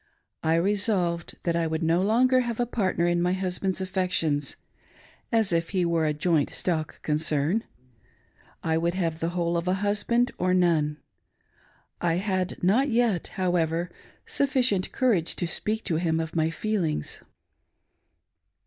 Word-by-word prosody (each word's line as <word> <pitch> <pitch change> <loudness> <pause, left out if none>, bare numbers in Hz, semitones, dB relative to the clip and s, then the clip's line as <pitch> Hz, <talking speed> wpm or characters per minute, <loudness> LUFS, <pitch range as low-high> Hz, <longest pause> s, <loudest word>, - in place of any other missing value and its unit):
I 160 0 +2
resolved 185 -2 0
that 170 -1 0
I 170 -1 +1
would, 160 +1 -2
no 165 +2 +2
longer 250 +6 +3
have 240 -2 -2
a 245 - +2
partner 190 -7 0
in 175 0 +1
my 180 +1 +1
husband's 190 0 -2
affections^as 180 -6 -1 1.0
if 165 0 0
he 185 -3 0
were 165 -2 +1
a 150 - +1
"joint 155 -1 +1
stock 160 -4 -2
concern! 155 +6 0 0.3
" 105 - -36
— - - -32
I 160 0 +1
would 170 +1 0
have 165 -4 -1
the 165 - -1
whole 170 0 0
of 170 +1 -3
a 185 - +2
husband, 235 +4 +1
or 185 +1 +2
none. 160 -4 +2 1.0
1 170 -1 +1
had 185 -2 -2
not 240 +10 +3
yet, 230 -6 +1
however, 175 -1 0 0.3
sufficient 255 -9 +1
courage 220 -11 +1
to - - -2
speak 215 +6 0
to 160 - -1
him 160 -1 0
of 160 0 -4
my 160 -1 +2
f 165 - -7
eeUngs. 185 - -1
175 Hz, 155 wpm, -26 LUFS, 165-200 Hz, 1.0 s, longer